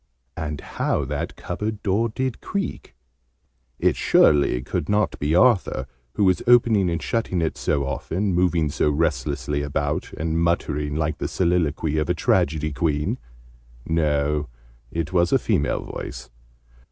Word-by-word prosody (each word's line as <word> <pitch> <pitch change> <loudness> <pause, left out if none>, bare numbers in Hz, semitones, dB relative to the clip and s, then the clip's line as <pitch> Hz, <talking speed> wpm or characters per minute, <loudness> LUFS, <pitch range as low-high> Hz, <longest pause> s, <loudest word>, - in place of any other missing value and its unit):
And 75 -2 -4
how 75 - -1
that 75 +1 -4
cupboard 105 -1 -4
door 105 +4 +1
did 130 +1 -3
creak! 200 -2 -4 0.8
It - - +2
surely 70 -4 +4
could - - -3
not 105 +1 +1
be 75 +3 +1
Arthur, 115 +1 +3 0.3
who 105 - 0
was 95 -2 +3
opening 115 -6 +5
and 85 -1 -1
shutting 110 -2 -1
it 80 -1 -1
so 70 -2 0
often, 90 +8 -2
moving 85 -4 +2
so 75 - +1
restlessly 75 -2 -1
about, 70 -1 -2
and 80 +1 -1
muttering 75 -3 0
like 80 0 -1
the - - -2
soliloquy 80 -4 0
of 75 - -1
a - - +2
tragedy 75 0 +1
queen! 75 -1 -1 0.7
No, 75 -2 0 0.4
it 85 +3 -3
was 85 -1 +3
a - - +5
female 75 - 0
voice. - - -7
80 Hz, 140 wpm, -23 LUFS, 75-95 Hz, 0.8 s, opening